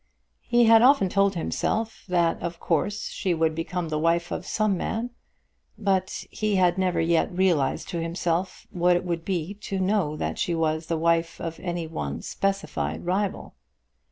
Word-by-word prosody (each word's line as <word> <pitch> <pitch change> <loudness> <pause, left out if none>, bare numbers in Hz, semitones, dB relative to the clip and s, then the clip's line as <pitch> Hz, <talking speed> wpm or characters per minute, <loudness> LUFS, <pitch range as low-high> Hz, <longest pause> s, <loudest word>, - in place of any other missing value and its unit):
He 240 0 +4
had 225 0 +7
often 255 -6 +5
told 195 +1 +2
himself 220 +6 -2
that 175 -2 +1
of 170 0 -4
course 205 +5 -1
she 185 -3 -1
would 160 -1 +1
become 165 +1 -3
the 155 -1 -1
wife 170 +2 +1
of - - -4
some 215 -3 +1
man, 225 +6 -3 0.7
but 190 -3 0
he 215 -1 -1
had 180 -2 +4
never 185 -2 0
yet 165 0 +2
realised 175 -7 +1
to 170 -3 -2
himself 170 +2 -2
what 180 0 +3
it 175 - -1
would 170 -2 -2
be 180 0 -2
to 200 -1 -5
know 185 -5 +1
that - - -3
she 170 - 0
was 160 0 0
the 165 - 0
wife 165 +1 +1
of 165 -1 -5
any 175 -2 -3
one 70 - -5
specified 185 - -2
rival. 190 +2 -1
175 Hz, 170 wpm, -25 LUFS, 165-195 Hz, 0.7 s, had